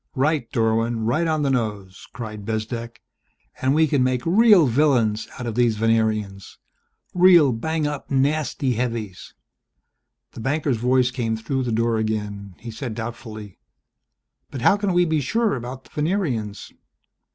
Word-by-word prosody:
"Right, 140 -2 0
Dorwin! 115 0 0
Right 155 +9 +1
on 155 -2 0
the 140 - +1
nose!" 105 -6 -3
cried 105 -3 -7
Bezdek. 115 +2 -5 0.6
"And 130 +2 +2
we 160 +1 +4
can 145 -3 +1
make 130 -1 -1
real 200 -1 +6
villains 120 -5 +2
out 125 - -6
of 115 - -3
these 115 -1 +2
Venerians, 110 -3 -1 0.6
real 175 -7 +6
bang 155 +7 -2
up 145 -1 -4
nasty 140 -1 0
heavies!" 115 -5 -4 1.0
The - - -11
banker's 140 +1 0
voice 125 +2 +2
came 115 -3 -2
through 130 +4 -2
the 120 - -2
door 115 0 +1
again. 105 -3 -3
He 115 - -8
said 110 0 -6
doubtfully, 110 -3 -8 0.9
"But 130 - -7
how - - +5
can 205 -2 -1
we 175 0 +4
be 160 -2 0
sure 225 - 0
about 130 +1 -7
the - - -22
Venerians 150 - -2
120 Hz, 150 wpm, -22 LUFS, 110-145 Hz, 1.0 s, real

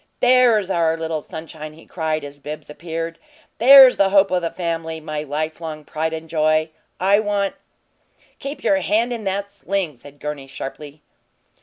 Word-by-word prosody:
"THERE'S 245 -6 +4
our 165 -2 +1
little 160 -1 -3
sunshine!" 155 0 -9
he 160 - -16
cried, 155 -3 -2
as 145 0 -9
Bibbs 150 +1 -8
appeared. 165 +1 -5 0.4
"THERE'S 265 +2 +9
the 195 -1 +4
hope 195 -1 +4
o' 180 - +2
the 170 -1 -2
family 165 -2 -4
my 155 -1 -4
lifelong 155 +1 -5
pride 160 +2 -2
and 160 0 -6
joy! 155 0 +1 0.3
I 195 +3 +4
want 205 -2 0 0.5
" - - -36
"Keep 280 +1 -6
you - - +3
hand 235 -3 +1
in 225 -3 -6
that 200 +1 -2
sling," 195 -5 -3
said 145 +4 -15
Gurney, 150 -2 -5
sharply. 145 +2 -8
165 Hz, 165 wpm, -21 LUFS, 155-200 Hz, 0.5 s, THERE'S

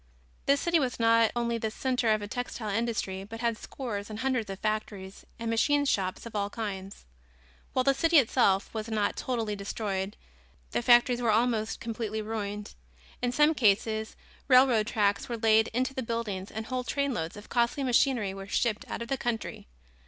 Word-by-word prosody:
This 280 0 +4
city 340 -1 +3
was 255 -4 -2
not 230 -1 +5
only 235 -1 0
the 220 - -1
center 250 0 0
of 215 -1 +2
the 205 - -5
textile 235 -2 -4
industry, 205 -3 -2
but 225 +3 -8
had 235 -1 +1
scores 215 -3 -6
and 215 - -6
hundreds 255 -5 0
of 195 - -5
factories 210 -2 -4
and 230 - -5
machine 285 +6 +2
shops 190 -7 -1
of 230 - -9
all 200 -1 0
kinds. 200 -3 -6 0.7
While 255 - +2
the 275 +1 +4
city 330 +4 +3
itself 225 -7 +3
was 220 0 -4
not 210 -2 0
totally 225 -5 -2
destroyed, 200 -1 -3 0.5
the 120 - 0
factories 240 - +5
were 235 - +1
almost 220 0 +1
completely 220 -2 -3
ruined. 210 -1 -4 0.5
In 245 0 +1
some 295 +5 +4
cases 220 -2 +1 0.3
railroad 250 -5 +5
tracks 205 -2 +1
were 235 - -2
laid 220 0 +4
into 255 +3 -1
the 265 - -3
buildings 225 -5 -3
and 220 +1 -5
whole 255 +1 -2
trainloads 245 - -2
of 205 - -12
costly 245 +4 +1
machinery 245 -5 +2
were 195 0 -8
shipped 215 +1 0
out - - -3
of - - -9
the 270 - -1
country. 235 - -3
225 Hz, 180 wpm, -29 LUFS, 210-245 Hz, 0.7 s, not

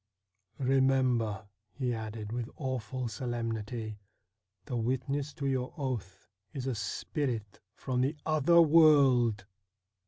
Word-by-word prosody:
' 100 -3 -51
Remember,' 130 -5 +2 0.3
he 125 -1 -1
added 110 -1 -5
with 120 0 -3
awful 130 -2 -3
solemnity, 115 -2 -4 0.3
' 100 -1 -51
the 130 - -4
witness 130 +5 -1
to 145 -4 -4
your 130 -2 -1
oath 110 - -4 0.3
is 130 -2 -4
a 135 - 0
spirit 110 +1 -3 0.2
from 125 -2 -2
the 140 +4 0
other 155 +2 +4
world 135 -9 +5
125 Hz, 120 wpm, -31 LUFS, 110-135 Hz, 0.3 s, world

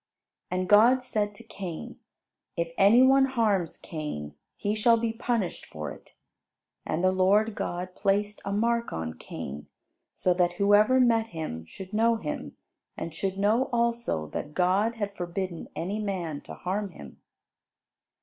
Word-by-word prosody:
And 185 0 -1
God 235 +6 +6
said 210 -4 -1
to 235 - -12
Cain, 190 -7 -7 0.6
"If 170 0 -2
any 220 +6 +6
one 270 +1 +6
harms 215 -10 0
Cain, 150 - -6 0.2
he 205 - -1
shall 230 +2 +4
be 225 0 -1
punished 225 -5 -2
for 75 -1 -6
it." - - -14 0.7
And 160 +3 -1
the 185 - +5
Lord 200 +4 +3
God 180 -2 -4
placed 205 +1 0
a 200 - -3
mark 235 +3 +1
on 80 0 -4
Cain, 70 +2 -7 0.5
so 180 - +2
that 175 -1 +2
whoever 205 +7 +4
met 230 -3 +3
him 155 - -5
should 190 - -10
know 230 +2 +3
him 160 -9 -5 0.4
and 165 - -5
should 190 +3 -2
know 215 +6 +3
also 235 - 0
that 150 - -5
God 195 +6 +2
had 205 -3 -4
forbidden 175 -1 -4
any 195 +5 -2
man 180 -8 -3
to - - -6
harm 195 +3 -2
him. 70 -3 -12
200 Hz, 150 wpm, -27 LUFS, 175-225 Hz, 0.7 s, God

